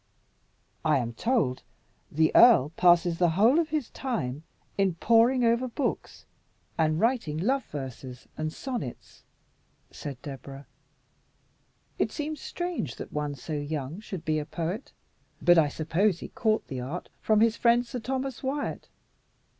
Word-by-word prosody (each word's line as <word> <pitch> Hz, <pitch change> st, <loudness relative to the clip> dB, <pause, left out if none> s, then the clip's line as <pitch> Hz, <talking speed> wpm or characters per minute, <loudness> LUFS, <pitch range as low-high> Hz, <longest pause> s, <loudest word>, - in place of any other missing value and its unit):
"I 155 Hz, -2 st, +3 dB
am 120 Hz, -2 st, -2 dB
told 155 Hz, -, 0 dB, 0.5 s
the 160 Hz, +1 st, +3 dB
earl 220 Hz, -, +7 dB
passes 175 Hz, -1 st, +4 dB
the 175 Hz, -1 st, +4 dB
whole 235 Hz, +10 st, +5 dB
of 325 Hz, -2 st, 0 dB
his 300 Hz, -5 st, -2 dB
time 150 Hz, -, -3 dB, 0.3 s
in 195 Hz, -3 st, +1 dB
poring 235 Hz, +7 st, +4 dB
over 235 Hz, +2 st, +2 dB
books 260 Hz, +3 st, -3 dB, 0.5 s
and 155 Hz, -1 st, +1 dB
writing 225 Hz, -, +1 dB
love 255 Hz, +8 st, 0 dB
verses 130 Hz, -3 st, -8 dB
and 155 Hz, 0 st, -3 dB
sonnets," 240 Hz, -, -6 dB, 0.7 s
said 140 Hz, -4 st, -7 dB
Deborah. 135 Hz, 0 st, -8 dB, 1.3 s
"It -, -, +1 dB
seems 300 Hz, -1 st, -4 dB
strange 350 Hz, 0 st, -4 dB
that -, -, -9 dB
one 150 Hz, -1 st, -2 dB
so 145 Hz, +4 st, -7 dB
young 145 Hz, +2 st, -4 dB
should 190 Hz, -5 st, -7 dB
be 155 Hz, 0 st, +1 dB
a 150 Hz, -, -4 dB
poet; 175 Hz, +8 st, -4 dB, 0.5 s
but 175 Hz, -1 st, +6 dB
I 155 Hz, -, +4 dB
suppose 165 Hz, +6 st, +1 dB
he -, -, -8 dB
caught 220 Hz, -2 st, 0 dB
the 130 Hz, -, -5 dB
art 140 Hz, +9 st, -5 dB
from 215 Hz, -1 st, +3 dB
his 225 Hz, 0 st, +4 dB
friend 235 Hz, +1 st, +3 dB
Sir 245 Hz, +1 st, -5 dB
Thomas 260 Hz, +2 st, -3 dB
Wyat." 280 Hz, +2 st, -3 dB
180 Hz, 145 wpm, -28 LUFS, 150-240 Hz, 1.3 s, earl